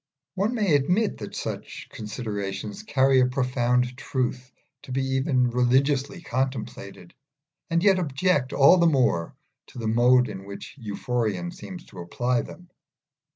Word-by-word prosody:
One 200 +6 0
may 205 -8 +1
admit 180 +10 +2
that - - -7
such - - -6
considerations 105 - -5
carry 135 -8 +3
a 125 - +4
profound 125 -1 0
truth 125 -1 -3 0.3
to - - -11
be 135 +1 0
even 130 -2 +1
religiously 135 +7 +1
contemplated, 115 - -4 0.6
and 170 +1 +1
yet 195 -2 +5
object 145 -3 0
all 140 +7 +6
the 170 -1 +4
more 125 - +1 0.3
to - - -14
the 115 -2 -3
mode 125 +3 +4
in 95 -2 -8
which 100 0 -9
Euphorion 120 - -2
seems 180 -1 -9
to 95 - -13
apply 120 +8 -1
them. 180 0 -12
130 Hz, 140 wpm, -25 LUFS, 120-160 Hz, 0.6 s, all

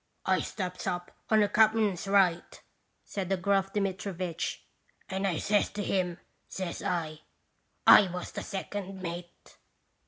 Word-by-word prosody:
" - - -46
I - - 0
steps 185 -3 -5
up 175 0 -3 0.2
on 220 -1 +5
the 205 - +4
cap'n's 215 -3 +3
right," 190 -4 +2 0.5
said 190 -3 -4
the 195 - +1
gruff 195 +1 +1
Dmitrivitch, 185 -4 -3 0.4
"and 195 +1 -1
I 175 -4 0
says 205 +4 +2
to 205 0 -3
him, 180 -3 0 0.3
says 185 -3 -5
I: 160 -3 -2 0.2
" - - -45
* - - -45
I 205 - +9
was 180 0 -5
the - - -5
second 195 -1 -5
mate. 175 0 -8
190 Hz, 155 wpm, -29 LUFS, 175-200 Hz, 0.5 s, I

